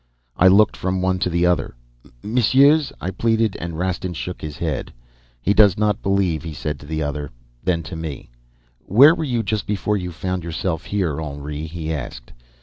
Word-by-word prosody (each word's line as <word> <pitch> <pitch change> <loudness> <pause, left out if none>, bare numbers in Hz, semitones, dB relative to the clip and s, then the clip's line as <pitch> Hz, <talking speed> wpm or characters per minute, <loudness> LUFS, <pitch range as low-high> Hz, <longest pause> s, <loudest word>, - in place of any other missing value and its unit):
"I 90 - +5
looked 100 +3 +5
from 95 0 -2
one 95 0 +1
to 90 - 0
the 85 0 +1
other. 90 -7 +1 0.5
'Messieurs,' 135 +7 +4
I 95 - -3
pleaded, 110 +1 +1
and 85 -2 -5
Rastin 90 0 -2
shook 90 +2 -5
his 75 -2 -6
head. - - -3 0.5
"'He 100 - +3
does 105 -3 +5
not 105 -1 +1
believe,' 95 -6 +1
he 80 -2 -7
said 75 0 -4
to 70 - -13
the 80 0 -2
other. 75 0 -3 0.3
Then 85 -3 0
to 90 - -7
me, 80 -6 -6 0.5
'Where 135 - +6
were 165 - -3
you 120 -6 -1
just 105 0 -2
before 105 0 0
you 90 -2 -4
found 90 +1 -3
yourself 80 0 -3
here, 85 -7 -1
Henri?' 75 +1 -5
he 80 -1 -4
asked. - - -7
90 Hz, 185 wpm, -21 LUFS, 80-105 Hz, 0.5 s, Where